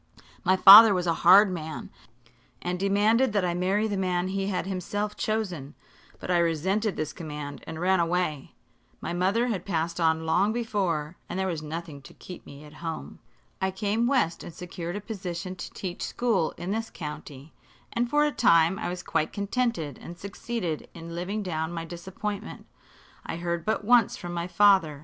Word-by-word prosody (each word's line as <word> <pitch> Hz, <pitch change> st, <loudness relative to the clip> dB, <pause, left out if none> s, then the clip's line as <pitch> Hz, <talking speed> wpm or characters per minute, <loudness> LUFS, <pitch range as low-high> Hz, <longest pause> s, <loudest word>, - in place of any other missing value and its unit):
My 185 Hz, +1 st, +3 dB
father 205 Hz, +2 st, +10 dB
was 180 Hz, -1 st, -1 dB
a 170 Hz, -, +2 dB
hard 190 Hz, +3 st, +7 dB
man, 160 Hz, -3 st, -6 dB, 0.7 s
and 180 Hz, 0 st, -3 dB
demanded 210 Hz, +5 st, +3 dB
that 200 Hz, -3 st, +2 dB
I 175 Hz, -, 0 dB
marry 190 Hz, +5 st, +1 dB
the 205 Hz, -2 st, -2 dB
man 185 Hz, -1 st, 0 dB
he 195 Hz, 0 st, -2 dB
had 185 Hz, -3 st, -2 dB
himself 205 Hz, +2 st, -3 dB
chosen; 185 Hz, -10 st, -3 dB, 0.4 s
but -, -, -4 dB
I 175 Hz, -, +4 dB
resented 185 Hz, +5 st, 0 dB
this 155 Hz, -1 st, -3 dB
command 150 Hz, -3 st, -7 dB
and 160 Hz, 0 st, -6 dB
ran 185 Hz, +1 st, +2 dB
away. 170 Hz, -4 st, -1 dB, 0.4 s
My -, -, -4 dB
mother 195 Hz, +8 st, +1 dB
had 195 Hz, -6 st, -2 dB
passed 170 Hz, -2 st, -2 dB
on 160 Hz, -1 st, +2 dB
long 180 Hz, +6 st, +2 dB
before, 185 Hz, -9 st, -2 dB
and -, -, -4 dB
there 190 Hz, -, 0 dB
was 170 Hz, -5 st, -2 dB
nothing 155 Hz, -1 st, -7 dB
to -, -, -15 dB
keep 180 Hz, -, -11 dB
me 140 Hz, +1 st, -11 dB
at 150 Hz, 0 st, -13 dB
home. 165 Hz, -, -6 dB, 0.4 s
I 190 Hz, -, +1 dB
came 205 Hz, +5 st, 0 dB
west 245 Hz, -11 st, +1 dB
and -, -, -8 dB
secured 175 Hz, 0 st, -6 dB
a 205 Hz, -, -4 dB
position 185 Hz, -4 st, -5 dB
to 175 Hz, -, -7 dB
teach 180 Hz, -3 st, -6 dB
school 220 Hz, -9 st, 0 dB
in 180 Hz, +2 st, -4 dB
this 225 Hz, +1 st, -2 dB
county, 150 Hz, -2 st, -8 dB, 0.4 s
and 235 Hz, +1 st, 0 dB
for 295 Hz, +2 st, +3 dB
a 295 Hz, -, +1 dB
time 170 Hz, -, +4 dB
I -, -, -3 dB
was 180 Hz, 0 st, -5 dB
quite 155 Hz, -, -1 dB
contented 200 Hz, -, -2 dB
and 175 Hz, -, -9 dB
succeeded 200 Hz, -4 st, -4 dB
in 165 Hz, 0 st, -8 dB
living 190 Hz, +5 st, -3 dB
down 160 Hz, -3 st, -3 dB
my 165 Hz, -1 st, -5 dB
disappointment. 190 Hz, +5 st, -6 dB, 0.6 s
I -, -, -5 dB
heard 170 Hz, -1 st, -3 dB
but 215 Hz, -1 st, -1 dB
once 240 Hz, -1 st, +4 dB
from 175 Hz, -2 st, -6 dB
my 170 Hz, 0 st, -3 dB
father. 185 Hz, -7 st, +4 dB
180 Hz, 180 wpm, -27 LUFS, 165-205 Hz, 0.7 s, father